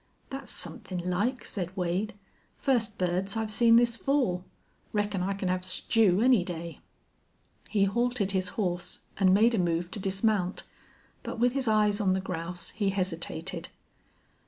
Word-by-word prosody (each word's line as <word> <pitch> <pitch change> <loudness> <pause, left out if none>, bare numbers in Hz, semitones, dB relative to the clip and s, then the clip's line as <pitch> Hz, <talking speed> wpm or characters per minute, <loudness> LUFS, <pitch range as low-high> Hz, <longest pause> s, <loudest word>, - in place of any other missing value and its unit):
"That's 270 0 -5
somethin' 180 -2 -3
like," 235 +8 0
said 185 -1 -4
Wade. 185 +4 -1 0.4
"First 235 -6 +1
birds 185 +3 -1
I've 220 -1 -1
seen 230 +1 +5
this 235 0 +4
fall. 250 -12 +1 0.5
Reckon 205 -2 0
I 195 +2 0
can 195 -1 -3
have 180 0 0
stew 185 +1 +2
any 250 -7 +5
day." 170 -2 -6 0.9
He 205 -2 +2
halted 235 0 +1
his 185 -1 0
horse 180 -4 -2 0.2
and 190 -2 +4
made 220 +5 +5
a 220 - +2
move 170 0 0
to 215 - -3
dismount, 195 -1 0 0.6
but - - -6
with 245 +1 +3
his 270 -2 -1
eyes 210 -1 +3
on 190 -2 +3
the 190 - +1
grouse 180 -1 -5
he 205 -2 0
hesitated. 180 -2 -3
195 Hz, 155 wpm, -29 LUFS, 180-225 Hz, 0.9 s, seen